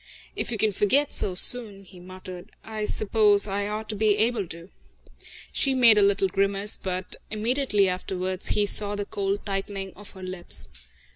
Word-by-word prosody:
"If -, -, -3 dB
you 225 Hz, -, -2 dB
can 215 Hz, +1 st, +1 dB
forget 260 Hz, +9 st, +1 dB
so 185 Hz, -, 0 dB
soon," 205 Hz, -1 st, +5 dB
he 185 Hz, -1 st, -16 dB
muttered, 185 Hz, 0 st, -11 dB
"I 215 Hz, -1 st, -5 dB
suppose 210 Hz, -1 st, +3 dB
I 200 Hz, 0 st, -3 dB
ought 215 Hz, +1 st, -5 dB
to 215 Hz, -, -2 dB
be 210 Hz, 0 st, +2 dB
able 220 Hz, -3 st, 0 dB
to." 170 Hz, +2 st, -11 dB, 0.8 s
She 270 Hz, -1 st, +1 dB
made 235 Hz, -4 st, +6 dB
a -, -, +4 dB
little 200 Hz, -1 st, +2 dB
grimace, 200 Hz, +2 st, +1 dB
but 185 Hz, 0 st, -5 dB
immediately 215 Hz, -2 st, 0 dB
afterwards 185 Hz, 0 st, -3 dB
he 210 Hz, -, +1 dB
saw 205 Hz, 0 st, +1 dB
the 205 Hz, 0 st, -4 dB
cold 200 Hz, -1 st, -3 dB
tightening 195 Hz, -1 st, -5 dB
of 205 Hz, 0 st, -12 dB
her 190 Hz, -, -10 dB
lips. 185 Hz, -1 st, -5 dB
200 Hz, 170 wpm, -25 LUFS, 190-215 Hz, 0.8 s, made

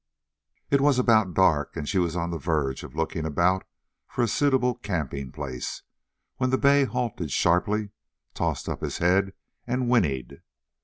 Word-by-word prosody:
It 140 Hz, -1 st, +4 dB
was 140 Hz, -2 st, +4 dB
about 110 Hz, -7 st, +3 dB
dark, 75 Hz, -6 st, +2 dB
and 75 Hz, -, -4 dB
she 95 Hz, -, +1 dB
was 85 Hz, -2 st, 0 dB
on 85 Hz, -1 st, -2 dB
the 85 Hz, -, -3 dB
verge 75 Hz, -6 st, -1 dB
of 65 Hz, -, -10 dB
looking 80 Hz, 0 st, -2 dB
about 85 Hz, +5 st, +1 dB, 0.4 s
for 125 Hz, -, -1 dB
a -, -, +2 dB
suitable 130 Hz, 0 st, +2 dB
camping 75 Hz, -, -4 dB
place, 65 Hz, -3 st, -5 dB, 0.5 s
when 130 Hz, 0 st, +1 dB
the 130 Hz, -, +2 dB
bay 140 Hz, 0 st, +4 dB
halted 120 Hz, -, -3 dB
sharply, 100 Hz, +7 st, +1 dB, 0.4 s
tossed -, -, -2 dB
up -, -, -4 dB
his -, -, -3 dB
head, 95 Hz, +3 st, +2 dB, 0.3 s
and 125 Hz, 0 st, -1 dB
whinnied. 70 Hz, -, 0 dB
95 Hz, 160 wpm, -26 LUFS, 80-125 Hz, 0.5 s, It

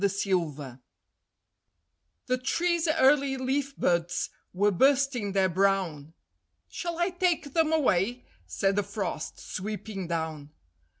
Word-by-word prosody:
THE 200 Hz, -, +3 dB
TREE 160 Hz, -10 st, -2 dB, 1.5 s
The 255 Hz, 0 st, +1 dB
tree's 340 Hz, +5 st, 0 dB
early 280 Hz, -3 st, +3 dB
leaf 270 Hz, +2 st, -1 dB
buds 175 Hz, 0 st, 0 dB, 0.2 s
were 205 Hz, +3 st, +2 dB
bursting 260 Hz, -1 st, +2 dB
their 190 Hz, -1 st, +3 dB
brown; 180 Hz, -5 st, 0 dB, 0.5 s
"Shall 345 Hz, -1 st, -4 dB
I 345 Hz, +2 st, +1 dB
take 350 Hz, -6 st, 0 dB
them 320 Hz, -1 st, +2 dB
away?" 245 Hz, -, +1 dB, 0.2 s
said 195 Hz, -, 0 dB
the -, -, +4 dB
Frost, 200 Hz, -5 st, -4 dB
sweeping 205 Hz, -1 st, -5 dB
down. 160 Hz, -3 st, -3 dB
205 Hz, 115 wpm, -28 LUFS, 175-275 Hz, 1.5 s, the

